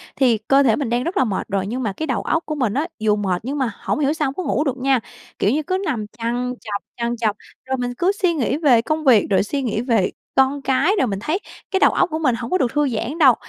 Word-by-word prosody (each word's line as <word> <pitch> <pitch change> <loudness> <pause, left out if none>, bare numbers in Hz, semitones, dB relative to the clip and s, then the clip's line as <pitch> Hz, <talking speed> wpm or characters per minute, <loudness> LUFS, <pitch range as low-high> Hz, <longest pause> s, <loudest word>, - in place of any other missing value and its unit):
Thì 245 -5 +3
cơ 270 +6 +3
thể 230 -5 +4
mình 275 -3 -2
đang 240 +1 0
rất 355 +7 -3
là - - +4
mệt 210 -6 -2
rồi, 195 0 -1
nhưng 250 +5 -3
mà 205 -4 -1
cái 315 +10 -4
đầu 255 - -1
óc 330 - 0
của 305 - -3
mình 250 -8 0
á, 300 +7 0
dù 215 -1 +2
mệt 190 -4 -1
nhưng 280 +3 -3
mà 260 -4 0
hổng - - -2
hiểu 290 0 +2
sao 305 -2 -1
hông 265 - -3
có 370 - -3
ngủ 295 - 0
được 270 -4 -2
nha. 265 -1 +2 0.4
Kiểu 200 - +2
như 305 +4 0
cứ 370 +5 -1
nằm 240 - -2
trằn 240 +2 -2
trọc, 205 -2 -4
trằn 235 0 -1
trọc, 220 -3 0 0.3
rồi 265 0 -1
mình 245 -1 -2
cứ 360 +7 +2
suy 360 -3 +3
nghĩ 275 -3 0
về 270 -8 +4
công 310 +5 -2
việc, 245 -7 +5
rồi 195 -1 +3
suy 275 +6 -2
nghĩ 225 -3 -1
về 230 -7 +1 0.2
con 270 +1 +3
cái 270 +6 +2
rồi 260 - +2
mình 195 -3 -3
thấy 310 - -1 0.3
cái 380 - +2
đầu - - +5
óc - - +2
của 315 0 -3
mình 265 -7 +2
hổng 235 +1 -6
có 370 - +3
được 250 -9 0
thư 295 -1 +2
giãn 240 +6 -3
đâu. 270 -7 +6
255 Hz, 290 wpm, -21 LUFS, 230-295 Hz, 0.4 s, đâu